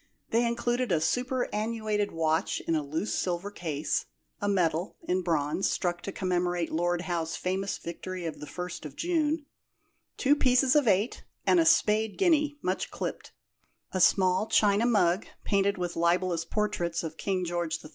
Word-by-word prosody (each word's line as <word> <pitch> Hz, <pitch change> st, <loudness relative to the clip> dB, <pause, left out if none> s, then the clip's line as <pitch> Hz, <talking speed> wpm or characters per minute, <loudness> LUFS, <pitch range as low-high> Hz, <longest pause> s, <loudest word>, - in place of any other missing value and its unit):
They 235 Hz, +1 st, +3 dB
included 240 Hz, 0 st, 0 dB
a 165 Hz, -, +3 dB
superannuated 220 Hz, 0 st, -1 dB
watch 160 Hz, 0 st, 0 dB
in 165 Hz, -, -1 dB
a 155 Hz, -, +1 dB
loose 155 Hz, +8 st, -3 dB
silver 180 Hz, +2 st, -2 dB
case, 155 Hz, -6 st, -2 dB, 0.3 s
a 205 Hz, -, 0 dB
medal 175 Hz, -2 st, 0 dB
(in 185 Hz, +1 st, 0 dB
bronze) 160 Hz, 0 st, 0 dB
struck 175 Hz, -1 st, -1 dB
to 195 Hz, -, -5 dB
commemorate 180 Hz, -2 st, -1 dB
Lord 175 Hz, +1 st, 0 dB
Howe's 170 Hz, -3 st, -2 dB
famous 190 Hz, +2 st, -2 dB
victory 180 Hz, +1 st, -6 dB
of 160 Hz, -, -5 dB
the 150 Hz, -, -8 dB
First 180 Hz, 0 st, -6 dB
of 145 Hz, -3 st, -8 dB
June, 315 Hz, -3 st, 0 dB, 0.7 s
two 285 Hz, +2 st, +4 dB
pieces 255 Hz, 0 st, +3 dB
of 295 Hz, -4 st, +4 dB
eight 205 Hz, +3 st, +1 dB, 0.2 s
and 355 Hz, -, +5 dB
a 330 Hz, -, +4 dB
spade 215 Hz, 0 st, +3 dB
guinea 305 Hz, -5 st, +2 dB
(much 185 Hz, +1 st, -1 dB
clipped); -, -, -5 dB, 0.6 s
a 185 Hz, -, -1 dB
small 185 Hz, +3 st, +4 dB
china 210 Hz, +2 st, +3 dB
mug 190 Hz, -4 st, +2 dB, 0.2 s
painted 200 Hz, 0 st, +1 dB
with 175 Hz, -1 st, -3 dB
libellous 170 Hz, 0 st, +1 dB
portraits 175 Hz, -4 st, -1 dB
of 160 Hz, -1 st, -5 dB
King 185 Hz, -2 st, -1 dB
George 170 Hz, -1 st, -1 dB
III. -, -, -9 dB
185 Hz, 160 wpm, -28 LUFS, 170-220 Hz, 0.7 s, and